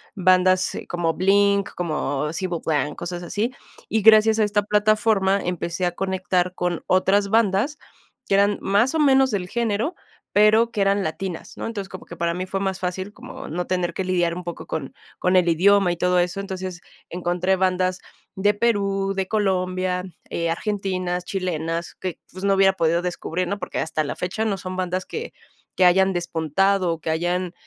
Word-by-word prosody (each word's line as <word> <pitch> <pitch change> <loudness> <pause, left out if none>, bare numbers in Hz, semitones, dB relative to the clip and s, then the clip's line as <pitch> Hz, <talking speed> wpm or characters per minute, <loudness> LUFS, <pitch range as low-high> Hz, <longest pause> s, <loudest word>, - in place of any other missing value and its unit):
bandas 185 0 +3
como 170 -2 -1
Blink, 200 +3 +2
como 150 -3 -2
Sable 175 -1 -3
Blanc, 150 -2 0
cosas 175 0 -5
así. 215 +8 -2 0.4
Y 220 - +1
gracias 220 +1 +6
a - - +4
esta 205 0 +1
plataforma 210 -1 +2
empecé 175 0 -2
a 175 - +1
conectar 185 -1 -1
con 175 -2 -2
otras 195 +2 +3
bandas 220 +6 +2 0.5
que 195 - +2
eran 200 +1 +3
más 215 +9 +2
o - - +1
menos 270 -2 +5
del 180 -3 -2
género, 230 - -1 0.4
pero 215 +3 +4
que 215 - -4
eran 195 0 +2
latinas, 160 +2 -5
¿no? - - -5
Entonces, 205 -4 -5
como 185 - -9
que 170 - -10
para 170 0 -1
mí 180 +1 -3
fue 195 +1 -3
más 190 -1 -2
fácil 185 +2 -3
como - - -10
no 175 +3 -3
tener 180 -2 -1
que 190 - -2
lidiar 175 -2 +1
un 180 - -6
poco 175 - -6
con 145 -4 -4 0.2
con 180 +1 +1
el 180 -2 +4
idioma 190 +3 +4
y 175 - -3
todo 180 +1 +2
eso. 180 +2 -1
Entonces, 185 -2 -5 0.3
encontré 180 +2 0
bandas 185 0 +1 0.4
de 205 +2 +2
Perú, 200 -3 0
de 190 -1 -1
Colombia, 185 -3 0 0.3
eh, 170 0 -1
argentinas, 185 -2 -2
chilenas, 170 -3 -3
que, 185 -3 -5
pues, 185 +1 -9
no 200 - +4
hubiera 195 0 +5
podido 170 -1 +1
descubrir, 180 0 -3
¿no? 200 0 -2
Porque 180 - -4
hasta 160 -1 -1
la 140 - -4
fecha 190 +5 -2
no 205 -3 0
son 185 -1 -6
bandas 185 0 -2
que 455 +2 -6 0.4
que 185 - +4
hayan 190 +2 +5
despuntado 175 +2 +1
o 165 - -3
que 160 - -5
hayan, 175 +2 -1
185 Hz, 180 wpm, -23 LUFS, 175-200 Hz, 0.5 s, gracias